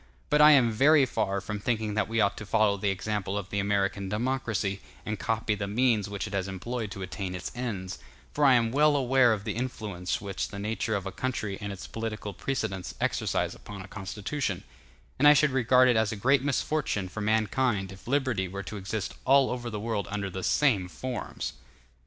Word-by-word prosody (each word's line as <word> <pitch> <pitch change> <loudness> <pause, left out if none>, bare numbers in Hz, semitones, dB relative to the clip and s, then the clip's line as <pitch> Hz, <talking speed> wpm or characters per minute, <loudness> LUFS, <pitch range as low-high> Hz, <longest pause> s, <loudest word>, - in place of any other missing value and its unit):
But 150 0 +5
I 150 0 +9
am 125 -5 +5
very 140 +5 +5
far 100 -5 -1
from 105 +1 -5
thinking 110 -1 -1
that 110 - 0
we 115 0 -1
ought 100 -1 +3
to 110 - -6
follow 105 -1 +3
the 100 0 -1
example 100 0 -2
of 100 -1 -5
the 100 - 0
American 100 -1 0
democracy, 110 -4 -1 0.2
and 105 -1 -3
copy 115 -1 0
the 100 -1 -3
means 110 -1 +2
which 100 -1 -3
it 105 - -7
has 95 -1 -1
employed 110 +4 -4
to 95 -1 -6
attain 95 0 -4
its 90 - -5
ends; 105 -7 -4 0.3
for 150 - 0
I 135 -2 +7
am 115 -2 +2
well 150 +3 +4
aware 130 -2 +4
of 105 -3 -1
the - - -2
influence 105 -7 -3
which 100 -1 -3
the 100 - -8
nature 110 +2 -1
of 100 -1 -3
a 95 - -4
country 110 -5 -3
and 100 -1 -4
its 100 +1 -7
political 110 -2 -5
precedents 95 -5 -3
exercise - - 0
upon 100 -2 -9
a - - -11
constitution; 100 +2 -4 0.6
and 145 - +6
I 150 - +9
should 150 0 +4
regard 130 0 +5
it 125 - +4
as 110 -1 +2
a - - -3
great 130 +6 +3
misfortune 140 -7 0
for 110 +4 -6
mankind 110 -1 +1
if 95 +2 -13
liberty 130 -8 +1
were 100 +2 -6
to 105 - -6
exist 100 +1 -4
all 135 0 +4
over 120 -1 -4
the 105 -2 -4
world 110 -2 -2
under 100 -1 -3
the 95 - -5
same 105 -6 +2
forms. 120 +9 -5
110 Hz, 205 wpm, -28 LUFS, 100-125 Hz, 0.6 s, I